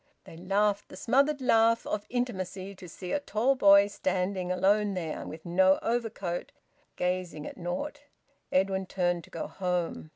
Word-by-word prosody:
They - - -12
laughed 200 +4 0
the - - -10
smothered 275 +7 +2
laugh 230 -2 +4
of 210 -1 -3
intimacy 195 -6 -3
to 185 -2 -12
see 180 +1 -7
a 290 - +1
tall 260 -1 +1
boy 200 -5 +7
standing 185 -2 -2
alone 200 +2 +2
there, 165 -4 -4
with 160 0 -9
no 185 +2 +4
overcoat, 225 -7 -2 0.4
gazing 180 -4 -2
at - - -7
naught. 195 - -4 0.5
Edwin 190 0 +1
turned 175 -2 0
to - - -20
go 165 - -5
home. 180 -4 -3
190 Hz, 155 wpm, -29 LUFS, 180-215 Hz, 0.5 s, boy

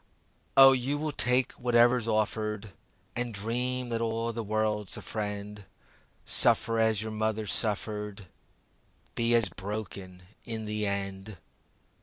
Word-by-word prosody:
O 135 0 +10
you 135 +2 0
will 155 +1 -2
take 125 -2 +2
whatever's 120 -1 +3
offered 110 -1 -1 0.4
And 120 -2 -1
dream 125 +4 -1
that 115 -1 -1
all 115 0 -1
the 115 0 -4
world's 105 -1 -1
a - - -7
friend. 105 -1 -5 0.6
Suffer 115 0 +3
as 110 -2 +2
your 110 - -5
mother 110 0 -1
suffered, 105 -1 -1 0.9
Be 115 0 +2
as 115 -4 +3
broken 95 -1 -7 0.2
in 110 -2 -4
the 105 0 -1
end. 100 0 -3
110 Hz, 125 wpm, -29 LUFS, 105-115 Hz, 0.9 s, O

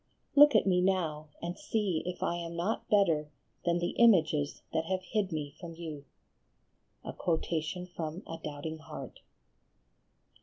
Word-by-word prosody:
Look 295 0 +8
at - - +5
me 180 -2 +3
now, 165 -5 0 0.2
and 175 +1 -4
see 210 - 0
if 180 - -3
I 170 - +1
am 170 -1 -5
not 180 +6 -2
better 165 -8 +3 0.4
than 170 0 +3
the 175 0 -1
images 160 -10 +4
that 160 - +1
have 185 +2 -1
hid 195 +1 -1
me 150 -3 -3
from 165 -1 -8
you." 155 -4 -7 1.0
A - - -4 1.3
Doubting 155 +2 -5
Heart. 155 -5 -9
170 Hz, 130 wpm, -31 LUFS, 155-190 Hz, 1.3 s, Look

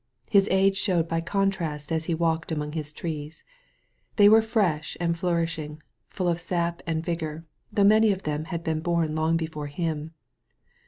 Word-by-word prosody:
His 200 0 +5
age 195 +1 +3
showed 175 -5 +1
by 165 0 -1
contrast 165 -6 -1
as 160 0 0
he 165 - 0
walked 165 0 0
among 150 -1 -2
his 150 -1 -4
trees. 155 -1 -6 0.7
They 205 -1 +7
were 220 +2 +7
fresh 205 -9 0
and 170 -1 0
flour 170 -1 +1
ishing) 155 -2 -6 0.3
full 185 -2 -2
of 170 0 0
sap 170 -1 -2
and 160 0 -1
vigor, 165 -2 -3 0.3
though 205 -1 +2
many 215 +1 +6
of 195 -1 -3
them 150 +1 -2
had 170 -1 -4
been 160 -1 -1
bom 165 -1 0
long 160 +1 +1
before 160 -2 -4
him. 160 +1 -3
165 Hz, 175 wpm, -26 LUFS, 155-185 Hz, 0.7 s, They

